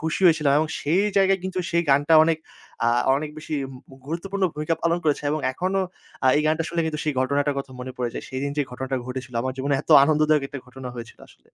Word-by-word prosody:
খুশি 160 +2 -2
হয়েছিলাম 155 -4 +4
এবং 155 +1 0
সেই 170 +7 +2
জায়গায় 195 0 +4
কিন্তু 190 0 -3
সেই 170 0 +2
গানটা 145 +4 +4
অনেক 160 -1 +1 0.5
আ - - +5 0.3
অনেক 150 +1 -4
বেশি 155 0 -5 0.3
মু - - -14
গুরুত্বপূর্ণ 190 +6 -4
ভূমিকা 155 +2 -1
পালন 170 +1 +2
করেছে 150 -2 +1
এবং 155 - 0
এখনো 185 +7 -1 0.4
আ - - +5
এই 150 - +2
গানটা 160 +1 +1
শুনলে 170 0 -1
কিন্তু 155 -1 -3
সেই 150 -2 0
ঘটনাটার 140 +2 +1
কথা 135 -1 -6
মনে 130 +1 -6
পড়ে 125 -1 -2
যায়। - - -5
সেদিন 135 +2 -3
যেই 145 -2 0
ঘটনাটা 130 +1 -3
ঘটেছিলো। 125 -2 -6
আমার 130 +1 -2
জীবনে 140 +2 0
এত - - -11
আনন্দদায়ক 155 -1 +3
একটা 140 - -6
ঘটনা 125 0 -8
হয়েছিল 115 -1 -9
আসলে। - - -23
150 Hz, 220 wpm, -24 LUFS, 135-165 Hz, 0.5 s, আ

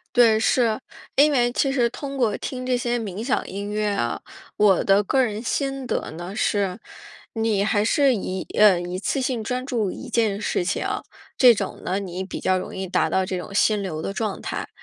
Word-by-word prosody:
对， 230 -3 +6
是。 225 -1 +2 0.4
因 295 +2 +6
为 245 -3 +3
其 270 +2 +1
实 240 -3 +2
通 275 +1 -6
过 230 -5 +1
听 255 -1 -5
这 255 -1 +1
些 240 0 -1
冥 210 0 -5
想 265 - 0
音 200 +1 -5
乐 210 0 0
啊， 120 -13 -1 0.3
我 205 -3 +4
的 195 +1 +4
个 260 +6 +2
人 215 0 -3
心 270 +1 -2
得 - - -2
呢， 175 +5 -7
是 200 -1 0 0.5
你 220 -3 +1
还 205 0 +2
是 275 +3 +3
一 190 -3 -4
呃， 200 -4 +6
一 175 +1 -4
次 270 +6 -1
性 250 -3 -1
专 250 +3 -3
注 225 -8 -1
一 265 - -8
件 215 -4 +1
事 185 - -1
情。 175 - -1 0.5
这 250 -2 +8
种 210 - -4
呢 190 +2 -1
你 185 -1 -5
比 190 - -6
较 185 0 +1
容 185 - -5
易 190 0 -3
达 180 - +1
到 190 0 +1
这 185 - -3
种 180 +2 -7
心 210 0 +2
流 160 -5 -4
的 195 - -3
状 215 -2 -3
态。 - - -4
215 Hz, 225 characters per minute, -23 LUFS, 195-245 Hz, 0.5 s, 这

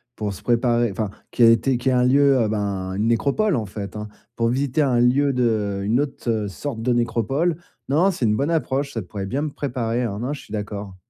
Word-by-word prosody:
pour 105 -2 -3
se - - -11
préparer, 120 -1 +2
enfin 105 +1 -2 0.2
qui 120 - +2
a 115 - +9
été 115 +3 +3
qui 125 +2 0
est - - +2
un 125 -1 +3
lieu 135 -2 +4
ben, 100 -3 -2
une 105 +3 0
nécropole 140 - +2
en 115 -4 -1
fait, 100 0 -7
hein, 105 0 -5 0.3
pour 115 0 +1
visiter 135 +3 0
un 130 -4 +2
lieu 135 +4 +3
de 110 -5 0
une 115 +7 +2
autre 115 -7 -2
sorte 115 +3 -5
de 125 +2 +1
nécropole, 120 - 0 0.3
non 170 +8 +3
c'est 150 -9 -2
une 105 -1 +2
bonne 140 +7 0
approche, 140 -3 -1
ça 115 - -2
pourrait 95 +1 -6
bien 130 +9 -2
me 155 - -1
préparer, 125 -4 -2
hein, 105 -4 -3
non, 125 +5 -2
je 145 - -7
suis - - -17
d'accord. 105 -2 -5
120 Hz, 225 wpm, -22 LUFS, 105-135 Hz, 0.3 s, a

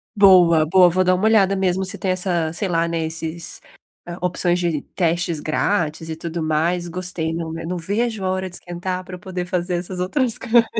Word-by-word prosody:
Boa, 180 -6 +6
boa, 180 +2 +5
vou 185 +2 +2
dar 185 0 +3
uma 185 +4 -1
olhada 200 -3 +4
mesmo 190 0 0
se 200 +2 +2
tem 190 - -1
essa, 180 -3 0
sei 190 +4 -2
lá, 170 -1 0
né, 165 -1 -2
esses 165 +1 -3 0.6
opções 180 0 +1
de 170 -4 -1
testes 170 -2 0
grátis 160 0 -1
e 160 - -4
tudo 165 +1 -5
mais, 165 +3 0
gostei. 175 -2 0
Não 165 -1 -4
né 165 0 -6
não 180 +1 -3
vejo 210 +4 -2
a - - 0
hora 185 0 -3
de 180 - -9
esquentar, 180 +1 -5
pra 185 - -8
eu 180 - -12
poder 180 -1 -5
fazer 180 0 -2
essas 180 +1 -4
outras 230 +6 +2
coisas, 235 0 +3
180 Hz, 205 wpm, -20 LUFS, 165-190 Hz, 0.6 s, Boa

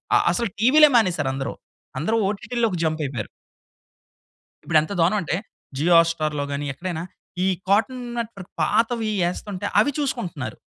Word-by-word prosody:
ఆహ్, - - +4
అసలు 235 -2 0
టీవీలే 295 +6 +7
మానేసారందరు. 145 -10 0 0.5
అందరూ 220 +9 0
ఓటీటీలోకి 210 -1 -1
జంప్ 155 0 0
అయిపోయారు. 135 - -4 1.4
ఇప్పుడెంత 155 +1 +2
దారుణం 175 +6 +3
అంటే 165 0 -1 0.4
జియో 170 +4 +3
హాట్‌స్టార్‌లో 155 -3 0
గాని, 145 +1 -3
ఎక్కడైనా 170 +1 -4 0.4
ఈ - - +2 0.2
కార్టూన్ 245 +5 +1
నెట్‌వర్క్ 220 -5 -6
పాతవి 225 0 +1
వేస్తుంటే, 185 +3 -3
అవి 285 +7 +3
చూసుకుంటున్నారు. 175 - -3
185 Hz, 125 wpm, -23 LUFS, 155-230 Hz, 1.4 s, టీవీలే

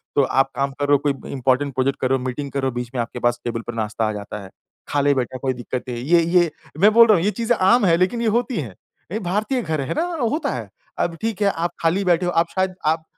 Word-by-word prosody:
तो 140 - +4
आप 135 +1 +1
काम 140 0 0
करो, 145 0 +4
कोई 140 - +3 0.2
इम्पोर्टेंट 135 +1 +1
प्रोजेक्ट 130 +1 0
करो, 130 0 +2
मीटिंग 130 +3 -4
करो, 135 -1 -1
बीच 120 -1 -5
में 120 - +1
आपके 115 +1 -5
पास 120 0 0
टेबल 115 -1 -3
पर 120 - -4
नाश्ता 110 +1 -2
आ - - -1
जाता 105 0 -7
है। 95 - -11 0.4
खा 145 - +1
ले 145 0 +3
बेटा, 130 -1 -2
कोई 130 0 -1
दिक्कत 125 +1 -5
है। 120 -1 -4
ये 170 +6 +4
ये 170 -1 +3 0.3
मैं 210 +4 +6
बोल 230 +1 +8
रहा 215 -3 +6
हूँ, 170 - 0
ये 210 - +2
चीज़ें 230 +1 +2
आम 205 +5 +4
हैं 165 -2 +4
लेकिन 185 +7 +1
ये 235 - +1
होती 245 -1 -4
हैं। 110 -9 -8 0.4
ये 215 - -1
भारतीय 215 +7 -1
घर 155 -8 -2
है 135 - -2
ना, 315 - 0 0.3
होता 310 - -1
है। - - -6 0.3
अब 170 - 0
ठीक 220 -2 -2
है 200 - +4
आप 170 -2 -2
खाली 170 +4 +2
बैठे 180 0 +3
हो, 175 - 0
आप 165 0 +2
शायद 185 -1 0
आप 160 +1 +1
150 Hz, 260 wpm, -21 LUFS, 130-185 Hz, 0.4 s, बोल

